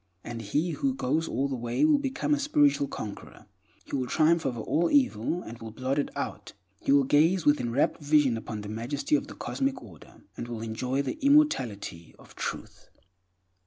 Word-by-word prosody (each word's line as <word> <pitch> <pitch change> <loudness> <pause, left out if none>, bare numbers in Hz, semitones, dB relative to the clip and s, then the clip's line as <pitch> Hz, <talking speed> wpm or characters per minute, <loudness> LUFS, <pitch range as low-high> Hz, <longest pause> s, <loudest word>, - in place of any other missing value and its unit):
And 115 -1 -6
he 150 - -1
who 265 - -1
goes 160 - 0
all 135 +4 0
the 135 - -3
way 120 - 0
will 305 -2 +4
become 275 +1 -1
a 295 - +1
spiritual 290 - +3
conqueror; 105 -6 -8 0.4
he - - -4
will 130 -2 -1
triumph 160 +2 +3
over 120 -3 -3
all 165 +9 +1
evil, 180 - +1
and 115 +1 -9
will 115 - -7
blot 130 +5 -2
it 145 - -1
out. - - -5 0.3
He - - 0
will 140 0 +6
gaze 160 +6 +3
with 145 0 +4
enrapt 120 +6 0
vision 145 -4 +3
upon 110 -1 -5
the 105 - -8
majesty 120 - -3
of - - -1
the - - -10
Cosmic 270 -1 -2
Order, 85 -8 -15
and 120 - -6
will 115 -2 -5
enjoy 125 +5 -2
the 130 - -4
immortality 125 - +2
of - - -17
Truth. - - -6
5. - - -33
140 Hz, 195 wpm, -28 LUFS, 115-175 Hz, 0.4 s, will